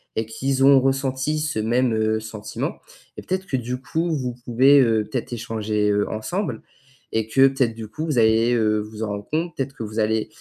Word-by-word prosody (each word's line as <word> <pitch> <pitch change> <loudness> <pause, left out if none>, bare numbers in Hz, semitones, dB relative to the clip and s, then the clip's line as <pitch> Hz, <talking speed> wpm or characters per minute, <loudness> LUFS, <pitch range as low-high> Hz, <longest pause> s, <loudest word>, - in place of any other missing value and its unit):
et 110 - -1
qui 120 +5 -3
s 135 0 0
ont 135 0 +7
ressenti 135 +2 0
ce 150 -7 -2
même, 120 +2 +1
heu, 110 0 +1
sentiment 110 -1 -5 0.4
et - - -6
peut-être 185 0 -3
que 135 - 0
du 125 +1 -4
coup, 165 +4 -1
vous 125 -4 -3
pouvez, 130 +4 +5
heu, 115 -3 +2
peut-être 125 -2 -4
échanger, 110 -2 -1
heu, 105 0 +1
ensemble 180 - -3 0.5
et 110 -1 0
que 135 +4 +6
peut-être 130 -4 0
du 110 -1 -7
coup 155 +9 -5
vous 150 -5 -1
allez, 115 +2 +4
heu, 110 -2 +2
vous 105 +1 -9
en - - -1
rendre 100 0 -5
compte? 165 +1 -1
Peut-être 135 0 -3
que - - -6
vous 110 +1 -5
allez, 110 0 +1
120 Hz, 215 wpm, -22 LUFS, 110-135 Hz, 0.5 s, ont